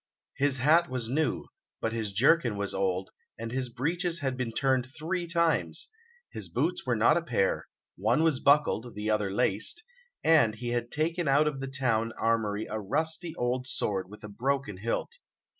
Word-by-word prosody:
His 140 Hz, -1 st, +2 dB
hat 155 Hz, +6 st, +4 dB
was 125 Hz, -3 st, -3 dB
new, 155 Hz, +4 st, 0 dB, 0.3 s
but 115 Hz, -, -2 dB
his 110 Hz, -3 st, -2 dB
jerkin 120 Hz, +1 st, +3 dB
was 100 Hz, 0 st, -3 dB
old, 95 Hz, -1 st, -1 dB, 0.3 s
and 115 Hz, +1 st, -5 dB
his 130 Hz, 0 st, -2 dB
breeches 170 Hz, +8 st, -1 dB
had 135 Hz, -5 st, -2 dB
been 125 Hz, -2 st, -3 dB
turned 130 Hz, +1 st, +1 dB
three 170 Hz, +3 st, -2 dB
times; 170 Hz, -, +1 dB, 0.4 s
his -, -, -6 dB
boots -, -, -1 dB
were -, -, +2 dB
not -, -, +4 dB
a -, -, +1 dB
pair, 485 Hz, +1 st, 0 dB, 0.3 s
one 160 Hz, -, +2 dB
was 160 Hz, -5 st, +2 dB
buckled, 140 Hz, -6 st, +2 dB
the 105 Hz, +1 st, -1 dB
other 105 Hz, -2 st, +1 dB
laced; 105 Hz, -, 0 dB, 0.4 s
and 150 Hz, -10 st, +5 dB
he 120 Hz, +2 st, -5 dB
had 120 Hz, 0 st, -1 dB
taken 165 Hz, +3 st, -1 dB
out 140 Hz, +3 st, +4 dB
of 145 Hz, -3 st, -2 dB
the 135 Hz, -, -4 dB
town 120 Hz, -4 st, 0 dB
armoury 110 Hz, -2 st, 0 dB
a 110 Hz, -, -3 dB
rusty 160 Hz, -, -1 dB
old 125 Hz, +1 st, -1 dB
sword 95 Hz, -7 st, -1 dB
with 105 Hz, +2 st, -13 dB
a -, -, -6 dB
broken 125 Hz, 0 st, -2 dB
hilt. 115 Hz, -, -3 dB
130 Hz, 175 wpm, -29 LUFS, 110-155 Hz, 0.4 s, and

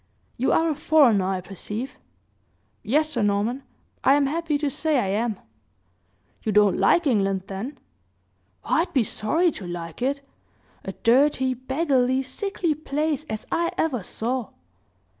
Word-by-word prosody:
You 255 Hz, -, +1 dB
are 325 Hz, -, +3 dB
a 320 Hz, -, +1 dB
foreigner, 275 Hz, -10 st, +4 dB
I 190 Hz, -1 st, -1 dB
perceive?" 210 Hz, +7 st, -6 dB, 0.8 s
"Yes, 305 Hz, +8 st, +1 dB
Sir 240 Hz, -, -1 dB
Norman, 205 Hz, +5 st, 0 dB, 0.4 s
I 270 Hz, -, +6 dB
am 290 Hz, -1 st, +3 dB
happy 310 Hz, +1 st, -1 dB
to 295 Hz, 0 st, -1 dB
say 305 Hz, +2 st, 0 dB
I 200 Hz, -7 st, 0 dB
am." 215 Hz, +1 st, -1 dB, 1.0 s
"You 215 Hz, -, -1 dB
don't 210 Hz, -1 st, +4 dB
like 260 Hz, -, +4 dB
England, 195 Hz, -7 st, +1 dB
then?" 200 Hz, +9 st, -6 dB, 0.9 s
"I'd 345 Hz, +2 st, +1 dB
be 260 Hz, -5 st, +3 dB
sorry 320 Hz, -, +1 dB
to 190 Hz, -10 st, -8 dB
like 170 Hz, 0 st, -7 dB
it; 280 Hz, +2 st, -1 dB, 0.6 s
a 195 Hz, -, -5 dB
dirty, 260 Hz, +3 st, +3 dB
beggarly, 260 Hz, 0 st, +1 dB
sickly 340 Hz, +4 st, -2 dB
place 300 Hz, 0 st, -2 dB
as 220 Hz, -7 st, -5 dB
I 340 Hz, +1 st, 0 dB
ever 270 Hz, -8 st, 0 dB
saw!" 235 Hz, +5 st, -3 dB
260 Hz, 140 wpm, -24 LUFS, 210-300 Hz, 1.0 s, I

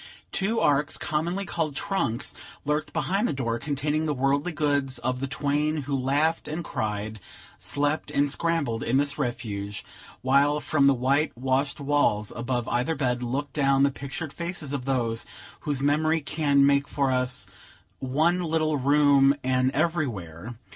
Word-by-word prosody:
Two 215 Hz, +4 st, +1 dB
arks, 145 Hz, +1 st, +2 dB
commonly 170 Hz, +5 st, -1 dB
called 160 Hz, -5 st, -2 dB
trunks, 140 Hz, -, -1 dB, 0.3 s
lurked 150 Hz, +1 st, -1 dB
behind 200 Hz, +5 st, 0 dB
the -, -, -1 dB
door, 115 Hz, -4 st, -2 dB
containing 150 Hz, +3 st, -1 dB
the 150 Hz, -, 0 dB
worldly 140 Hz, +5 st, +1 dB
goods 145 Hz, -4 st, 0 dB
of 125 Hz, +1 st, -2 dB
the 135 Hz, -, -2 dB
twain 145 Hz, +2 st, 0 dB
who 140 Hz, +1 st, -2 dB
laughed 145 Hz, +5 st, +1 dB
and 155 Hz, +3 st, -3 dB
cried, 105 Hz, -4 st, -3 dB, 0.4 s
slept 145 Hz, +2 st, 0 dB
and 145 Hz, +1 st, +2 dB
scrambled, 145 Hz, -6 st, 0 dB
in 125 Hz, +3 st, +1 dB
this 145 Hz, +1 st, +1 dB
refuge; 105 Hz, -6 st, -3 dB, 0.4 s
while 140 Hz, +3 st, +3 dB
from 145 Hz, -2 st, +2 dB
the 140 Hz, -, +5 dB
white 135 Hz, +3 st, +1 dB
washed 135 Hz, +3 st, 0 dB
walls 140 Hz, -7 st, +1 dB
above 120 Hz, 0 st, -2 dB
either 125 Hz, +7 st, 0 dB
bed, 125 Hz, -3 st, 0 dB
looked 130 Hz, +3 st, -3 dB
down 135 Hz, -2 st, +3 dB
the 140 Hz, -, +4 dB
pictured 140 Hz, +3 st, -6 dB
faces 170 Hz, -4 st, -5 dB
of 130 Hz, -3 st, -3 dB
those 120 Hz, -4 st, 0 dB, 0.3 s
whose 145 Hz, -3 st, -2 dB
memory 155 Hz, +3 st, +2 dB
can 140 Hz, -1 st, +2 dB
make 140 Hz, 0 st, +3 dB
for 140 Hz, -2 st, 0 dB
us 125 Hz, 0 st, 0 dB, 0.5 s
"One 155 Hz, +7 st, +1 dB
little 155 Hz, -2 st, +1 dB
room 140 Hz, 0 st, +5 dB
an 130 Hz, 0 st, +2 dB
everywhere." 120 Hz, -, -2 dB
140 Hz, 155 wpm, -26 LUFS, 130-150 Hz, 0.5 s, the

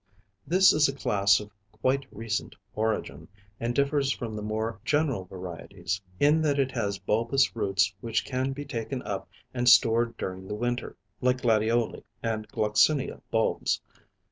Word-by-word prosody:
This 185 Hz, +2 st, +6 dB
is 150 Hz, -1 st, +4 dB
a 135 Hz, -, -4 dB
class 100 Hz, -6 st, +3 dB
of 105 Hz, 0 st, -9 dB, 0.2 s
quite 130 Hz, +5 st, 0 dB
recent 110 Hz, 0 st, -3 dB, 0.2 s
origin, 105 Hz, -9 st, -2 dB, 0.3 s
and 120 Hz, +1 st, -2 dB
differs 140 Hz, -1 st, +2 dB
from 115 Hz, -5 st, -4 dB
the 105 Hz, -, -4 dB
more 110 Hz, 0 st, -3 dB
general 140 Hz, -9 st, +1 dB
varieties, 90 Hz, +1 st, -5 dB, 0.2 s
in 150 Hz, +3 st, +4 dB
that 145 Hz, -2 st, +1 dB
it 135 Hz, -1 st, +1 dB
has 100 Hz, -6 st, -2 dB
bulbous 115 Hz, +8 st, +1 dB
roots 100 Hz, -3 st, +1 dB
which 115 Hz, -1 st, -1 dB
can 130 Hz, 0 st, -1 dB
be 145 Hz, +2 st, -6 dB
taken 125 Hz, -1 st, -4 dB
up 100 Hz, -2 st, -4 dB, 0.2 s
and 125 Hz, 0 st, +3 dB
stored 115 Hz, -2 st, +5 dB
during 95 Hz, 0 st, -5 dB
the 105 Hz, -, -4 dB
winter 120 Hz, +2 st, -3 dB, 0.2 s
like 125 Hz, 0 st, +2 dB
Gladioli 115 Hz, 0 st, +1 dB, 0.2 s
and 110 Hz, -2 st, -2 dB
Gloxinia 110 Hz, +8 st, +2 dB
bulbs. 110 Hz, 0 st, +1 dB
115 Hz, 150 wpm, -27 LUFS, 105-135 Hz, 0.3 s, This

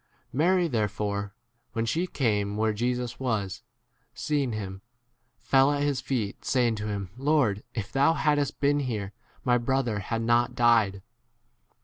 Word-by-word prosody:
Mary 175 Hz, +6 st, +3 dB
therefore, 105 Hz, -4 st, -2 dB, 0.4 s
when 115 Hz, 0 st, -1 dB
she 170 Hz, +10 st, 0 dB
came 105 Hz, -, 0 dB
where 110 Hz, 0 st, +1 dB
Jesus 125 Hz, +2 st, -2 dB
was, 110 Hz, -8 st, -2 dB, 0.5 s
seeing 145 Hz, -4 st, 0 dB
him, 95 Hz, -3 st, -5 dB, 0.6 s
fell 135 Hz, +1 st, +3 dB
at 145 Hz, 0 st, 0 dB
his 140 Hz, -3 st, 0 dB
feet, 120 Hz, -7 st, -3 dB
saying 120 Hz, -3 st, +2 dB
to 105 Hz, -1 st, -4 dB
him, 100 Hz, -3 st, -4 dB
Lord, 135 Hz, -7 st, +2 dB
if 105 Hz, -4 st, -4 dB
thou 140 Hz, +4 st, +4 dB
hadst 145 Hz, -3 st, +1 dB
been 145 Hz, +1 st, +3 dB
here, 110 Hz, -7 st, -3 dB, 0.3 s
my 125 Hz, -1 st, +3 dB
brother 120 Hz, -3 st, 0 dB
had 115 Hz, +3 st, -3 dB
33 -, -, -2 dB
not 120 Hz, +1 st, +2 dB
died. 115 Hz, -5 st, +3 dB
120 Hz, 145 wpm, -27 LUFS, 105-135 Hz, 0.6 s, thou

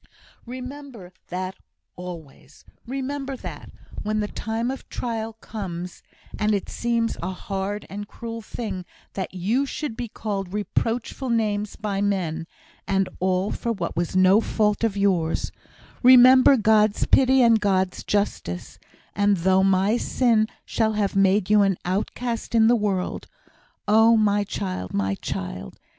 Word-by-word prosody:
"Remember 255 Hz, -6 st, -8 dB
that, 185 Hz, +1 st, -4 dB, 0.4 s
always. 175 Hz, -5 st, -10 dB, 0.2 s
Remember 270 Hz, +1 st, -4 dB
that, -, -, -8 dB, 0.3 s
when 215 Hz, +1 st, -1 dB
the 210 Hz, -, -1 dB
time 225 Hz, +4 st, -3 dB
of 270 Hz, -, -8 dB
trial 225 Hz, -2 st, -4 dB
comes 185 Hz, -5 st, -7 dB, 0.4 s
and 210 Hz, 0 st, +2 dB
it 200 Hz, -, -4 dB
seems 235 Hz, -1 st, -1 dB
a 175 Hz, -, -2 dB
hard 195 Hz, +2 st, -4 dB
and 205 Hz, +1 st, -7 dB
cruel 230 Hz, 0 st, -7 dB
thing 210 Hz, -4 st, -5 dB, 0.3 s
that 190 Hz, -1 st, -5 dB
you 225 Hz, +10 st, 0 dB
should 290 Hz, -4 st, -4 dB
be 240 Hz, 0 st, -4 dB
called 200 Hz, -4 st, -4 dB
reproachful 230 Hz, +5 st, -2 dB
names 210 Hz, -3 st, 0 dB
by 200 Hz, -2 st, -3 dB
men, 170 Hz, -5 st, -1 dB, 0.4 s
and 195 Hz, -1 st, +1 dB
all 185 Hz, +2 st, 0 dB
for 235 Hz, -, -2 dB
what 180 Hz, -6 st, -3 dB
was 175 Hz, +1 st, -2 dB
no 185 Hz, +3 st, +5 dB
fault 210 Hz, -1 st, 0 dB
of 215 Hz, -3 st, 0 dB
yours 180 Hz, -5 st, +1 dB, 0.5 s
remember 255 Hz, +2 st, +8 dB
God's 215 Hz, -1 st, +3 dB
pity 260 Hz, -1 st, +5 dB
and 230 Hz, -2 st, +5 dB
God's 190 Hz, -2 st, 0 dB
justice; 145 Hz, -, -2 dB, 0.4 s
and 205 Hz, -1 st, +3 dB
though 190 Hz, +2 st, +3 dB
my 195 Hz, +4 st, +3 dB
sin 230 Hz, -4 st, +2 dB, 0.2 s
shall 220 Hz, -1 st, 0 dB
have 205 Hz, -2 st, -1 dB
made 195 Hz, 0 st, +3 dB
you 210 Hz, 0 st, +5 dB
an 195 Hz, -3 st, +2 dB
outcast 230 Hz, +6 st, -2 dB
in 225 Hz, -1 st, +6 dB
the 240 Hz, +2 st, +5 dB
world 200 Hz, -4 st, -2 dB, 0.6 s
oh, 225 Hz, +2 st, +6 dB
my 205 Hz, -1 st, +2 dB
child, 90 Hz, -, -4 dB
my 95 Hz, -1 st, 0 dB
child!" 90 Hz, -7 st, -6 dB
205 Hz, 140 wpm, -24 LUFS, 185-230 Hz, 0.6 s, remember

